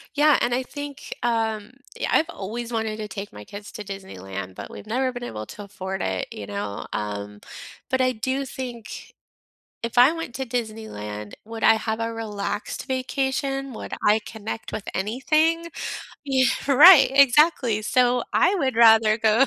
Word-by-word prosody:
Yeah, 295 0 +5
and 240 0 +1
I 255 - 0
think, 285 +1 -7
um 225 -2 -1 0.3
yeah, - - -1
I've 320 - +3
always 235 - -5
wanted 220 -1 -2
to 215 -1 -5
take 200 0 -7
my 105 - -9
kids 205 - -10
to 215 -3 -6
Disneyland, 95 - -7
but, - - -8
we've - - -10
never 255 +4 0
been 245 -1 -7
able 110 - -5
to 205 - -9
afford 190 -1 -5
it, 95 -1 -2
you 105 - -7
know, 100 0 -4
um, 105 0 -4 0.5
but 260 -1 +1
I 255 0 +3
do 260 +4 -2
think 245 -4 -7 0.7
if 235 +1 -5
I 255 +6 +7
went 330 -7 -6
to 265 - -3
Disneyland, 215 - -5
would 225 0 -7
I - - +7
have 220 0 -2
a 230 0 -2
relaxed 210 0 -4
vacation, 270 +1 -2
would - - -7
I 210 +1 +5
connect 220 0 -6
with 210 - -5
anything? 310 - +1 0.6
Yeah, 265 -2 +3 0.2
right, 290 +1 +9
exactly. 275 -4 +5
So 245 +2 +2
I 390 - +4
would 265 -9 0
rather 225 -2 +6
go 220 +4 +4
230 Hz, 165 wpm, -24 LUFS, 205-260 Hz, 0.7 s, right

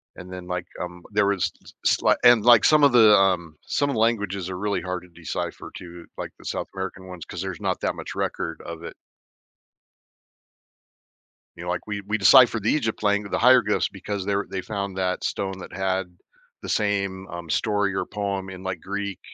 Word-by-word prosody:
And 90 +1 -10
then, 90 -1 -8
like, 90 -1 -3
um, 90 0 -7
there 105 0 +3
was 100 -3 +1
s - - -15
slight - - +3
and, 120 -3 +7
like, 120 -1 +7
some 155 -1 +5
of 140 - +7
the, 110 -3 +7
um, 90 -5 +2
some 145 0 0
of - - -1
the - - -1
languages 100 -5 0
are 90 - -4
really 105 +2 -1
hard 90 -1 -4
to - - -15
decipher, 85 -2 -6
too, 85 -1 -10
like - - -5
the - - -17
South - - -3
American 95 0 -6
ones, 90 -2 -8
cause 90 - -6
there's 95 -3 -5
not - - -1
that - - -1
much - - -7
record 80 - -3
of 85 0 -7
it. - - -8 2.6
You 85 - -8
know, 90 - -5
like, 90 - -2
we 105 -1 -3
we 110 - 0
deciphered 115 +1 +6
the 110 - +2
Egypt 110 -8 -1
lang 100 0 +2
the 100 - -2
hieroglyphs 120 -3 +4
because 100 0 -5
they're 100 0 0
they 95 - -3
found 100 -2 -4
that 90 -1 -1
stone 95 -1 -3
that - - -10
had 95 0 -1 0.6
the - - -7
same, 100 -2 -1
um, 85 -1 -8
story 105 +3 +1
or - - -1
poem 100 -2 -3
in, 95 0 -9
like, 95 -2 -3
Greek, 100 0 -4
95 Hz, 200 wpm, -24 LUFS, 90-105 Hz, 2.6 s, and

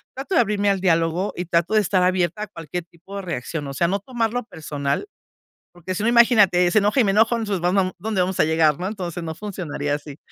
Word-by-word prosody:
trato 275 +8 -3
de - - +6
abrirme 205 -2 0
al 195 - +1
diálogo 165 +1 +1
y 180 - -4
trato 170 +4 0
de 215 - +5
estar 185 -1 +1
abierta 180 +2 0
a - - -6
cualquier 170 0 -6
tipo 175 +3 -14
de 195 - -5
reacción, 160 -2 -4
o 135 - -6
sea, 170 +5 +1
no 200 +3 0
tomarlo 240 +1 -2
personal, 150 - -4 0.7
porque 175 +2 -6
si - - -3
no, 235 - +3
imagínate, 210 -7 +5
se 215 - +5
enoja, 210 +6 +1
y - - +4
me 195 - +2
enojo, 225 +3 +3
entonces, 205 -6 -2
vam 180 +2 +1
vam 185 -2 +2
¿Dónde 210 -1 -1
vamos 185 +1 -1
a - - +6
llegar?, 160 -2 +2
¿no? 185 - -2
Entonces, 180 -5 -5
no 160 -1 -5
funcionaría 160 -8 -4
así. 145 0 -6
185 Hz, 240 wpm, -22 LUFS, 165-210 Hz, 0.7 s, de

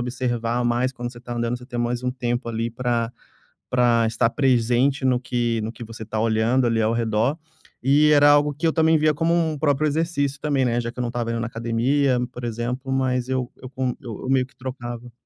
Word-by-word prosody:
observar 120 -1 -1
mais, 120 +2 +1
quando 120 -1 -6
você 120 - -12
tá 120 0 -6
andando 120 +1 -1
você 125 - -13
tem 120 -2 -5
mais 120 +1 -1
um 125 - 0
tempo 120 -1 -2
ali 115 +1 -2
pra 120 -1 -1 0.6
pra 120 -2 +3
estar 115 +1 +1
presente 130 +1 +2
no 125 -2 +3
que 120 -2 -1
no 110 - -3
que 120 - -9
você 110 0 -9
tá 110 0 -4
olhando 115 +3 +2
ali 115 -1 +1
ao 110 +1 +2
redor. 115 +5 +1 0.5
E 145 +3 +4
era 145 0 +6
algo 145 0 +4
que 155 +4 -2
eu 160 - +3
também 160 0 +4
via 155 0 +3
como 165 +3 +1
um 160 -3 0
próprio 145 0 +1
exercício 145 -3 -1
também, 145 -3 +1
né, 120 -1 +1
já 115 - -3
que 120 - -17
eu - - 0
não 120 - -1
estava 115 -1 -3
indo 115 - -2
na 115 - -2
academia, 125 +4 +1
por 125 - -8
exemplo, 120 +3 -3
mas 130 -2 0
eu 130 -2 -2
eu 130 - -7
com 130 -1 -2
eu 120 -3 -7
meio 130 -1 +3
que - - -28
trocava. 120 -2 -7
125 Hz, 225 wpm, -23 LUFS, 120-135 Hz, 0.6 s, era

